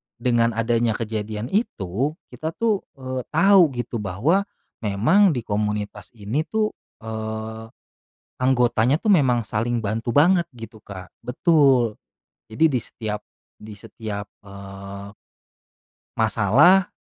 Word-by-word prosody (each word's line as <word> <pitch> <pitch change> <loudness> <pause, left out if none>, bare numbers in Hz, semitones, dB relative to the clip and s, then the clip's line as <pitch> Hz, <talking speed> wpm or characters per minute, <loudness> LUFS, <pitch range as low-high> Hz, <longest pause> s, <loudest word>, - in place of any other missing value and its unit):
dengan 120 -1 +1
adanya 115 -1 +1
kejadian 110 +1 -4
itu, 140 - -1 0.2
kita 160 +1 -5
tuh, 225 -4 +1 0.2
eee, 130 -1 -5
tahu 185 0 +6
gitu 120 -1 -4
bahwa, 135 - 0 0.3
memang 135 - +3
di 120 - -3
komunitas 105 -2 -3
ini 115 +10 -2
tuh, 215 -1 0 0.3
eee, 110 0 -5 0.7
anggotanya 125 +1 +2
tuh 220 - 0
memang 130 -10 +4
saling 115 +3 -2
bantu 110 +3 -2
banget, 170 +4 +4
gitu 115 -1 -10
Kak 95 -2 -9 0.2
betul. 130 -5 +3 0.5
Jadi 160 +9 +3
di 130 -5 0
setiap 105 -2 -5 0.3
di 110 0 -12
setiap, 105 -3 -7 0.2
eee 100 0 -10 1.0
masalah, 120 - +4
115 Hz, 115 wpm, -23 LUFS, 105-145 Hz, 1.0 s, tahu